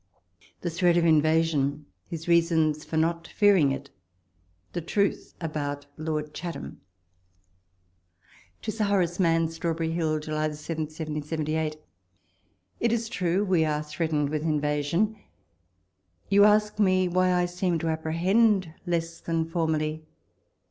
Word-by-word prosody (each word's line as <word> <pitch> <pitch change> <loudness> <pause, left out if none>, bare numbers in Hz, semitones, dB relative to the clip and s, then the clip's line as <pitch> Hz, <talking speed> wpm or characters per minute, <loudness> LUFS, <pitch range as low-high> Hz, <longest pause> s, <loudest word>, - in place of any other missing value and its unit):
THE 175 - -2
THREAT 175 +1 +3
OF 170 - +3
INVASION— 155 -2 +2 0.2
HIS 165 0 -7
REASONS 165 -3 +3
FOR 160 - -3
NOT 165 +1 0
FEARING 195 -9 +4
IT— 135 +1 -5 0.8
THE 175 - -2
TRUTH 200 +5 -1
ABOUT 145 -3 -3
LORD 155 -1 -3
CHATHAM. 170 +1 -7 1.8
To 215 - -2
8lK 225 - -11
IlORALE 200 -2 +3
ISIaNN. 165 -2 +1
Strawberry 165 0 -2
Hill, 160 -2 0
Juhj 155 0 -2
7, 155 +1 -4
1778.... 155 0 -3 1.0
It 235 - +2
is 230 -1 -1
true, 185 -3 0
we 180 -4 +3
are 150 -1 0
threatened 150 -1 -1
with 155 -1 -1
invasion. 150 +7 0 1.1
You 200 +1 +6
ask 210 0 +3
me 185 -2 +3
why 185 +1 +2
I 180 0 +2
seem 175 0 -1
to 165 +1 -2
apprehend 180 +4 +2
less 165 -1 -2
than 165 -1 -1
formerly? 160 -2 -1
165 Hz, 125 wpm, -27 LUFS, 155-180 Hz, 1.8 s, You